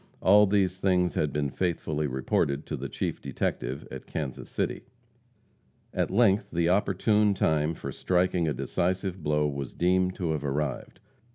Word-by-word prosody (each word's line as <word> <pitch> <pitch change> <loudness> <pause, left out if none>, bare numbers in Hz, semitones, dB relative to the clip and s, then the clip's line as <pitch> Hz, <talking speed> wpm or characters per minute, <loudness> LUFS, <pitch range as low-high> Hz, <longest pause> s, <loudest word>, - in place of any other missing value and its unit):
All 105 +3 +6
these 95 -2 +1
things 90 -2 +2
had 75 -2 0
been 70 -1 -1
faithfully 80 -4 -1
reported 70 +2 0
to 75 - -4
the 70 0 -5
chief - - -3
detective 65 +3 -3
at - - -8
Kansas 65 -4 -5
City. - - -2 1.1
At - - 0
length 100 0 +3
the 85 0 +1
opportune 105 +2 +2
time 80 -3 +1
for - - -6
striking 90 -2 +1
a 75 - +1
decisive 95 +5 -1
blow 75 0 +1
was 70 -2 -5
deemed 90 +1 +2
to 85 -3 -2
have 75 -2 -2
arrived. 70 0 -3
85 Hz, 155 wpm, -28 LUFS, 75-95 Hz, 1.1 s, All